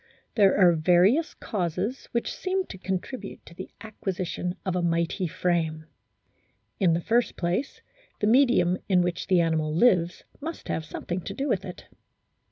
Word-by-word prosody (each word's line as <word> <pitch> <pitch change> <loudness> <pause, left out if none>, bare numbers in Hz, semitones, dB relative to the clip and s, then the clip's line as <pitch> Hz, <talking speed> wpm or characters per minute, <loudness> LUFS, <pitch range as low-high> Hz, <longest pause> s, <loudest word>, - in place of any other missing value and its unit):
There 200 -3 +4
are 180 -3 +6
various 180 - +3
causes 190 +5 -3
which 235 - -1
seem 375 0 -1
to 190 - -8
contribute 195 +4 -5
to - - -13
the 185 +2 -8
acquisition 185 -4 -4
of 185 -2 -1
a 180 - +1
mighty 170 +2 0
frame. 160 -2 -1 0.9
In 180 -5 +4
the 170 - 0
first 235 +6 +1
place, 180 +10 -2 0.4
the - - 0
medium 225 -7 +4
in 180 -2 +4
which 175 -1 -3
the 185 -2 +4
animal 160 -2 0
lives 175 -1 +3 0.2
must 320 +3 -7
have 160 - -2
something 175 +3 -4
to - - -6
do 275 +1 -2
with - - 0
it. - - -9
180 Hz, 160 wpm, -26 LUFS, 170-220 Hz, 0.9 s, are